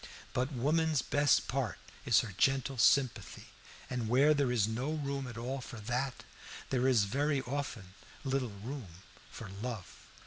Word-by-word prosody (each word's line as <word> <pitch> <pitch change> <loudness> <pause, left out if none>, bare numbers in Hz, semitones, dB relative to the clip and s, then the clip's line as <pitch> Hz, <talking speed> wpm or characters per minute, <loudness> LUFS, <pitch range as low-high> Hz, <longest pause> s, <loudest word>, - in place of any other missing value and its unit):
But 130 +3 0
woman's 150 +2 +1
best 145 -1 +3
part 130 -3 -1 0.3
is 120 - +6
her 110 -5 -7
gentle 135 +2 +1
sympathy, 130 +2 +2 0.4
and 125 -4 -3
where 140 +5 +5
there 140 -4 +1
is 110 -4 +2
no 125 +7 -2
room 140 -3 -3
at 120 -2 -8
all 130 +3 -3
for 120 -2 -8
that, 125 +4 -2 0.5
there 130 0 +2
is 120 -6 +5
very 140 +6 0
often 120 -8 -4 0.3
little 135 -2 0
room 100 - -8 0.3
for - - -9
love. 115 -6 -5
130 Hz, 150 wpm, -33 LUFS, 115-140 Hz, 0.5 s, is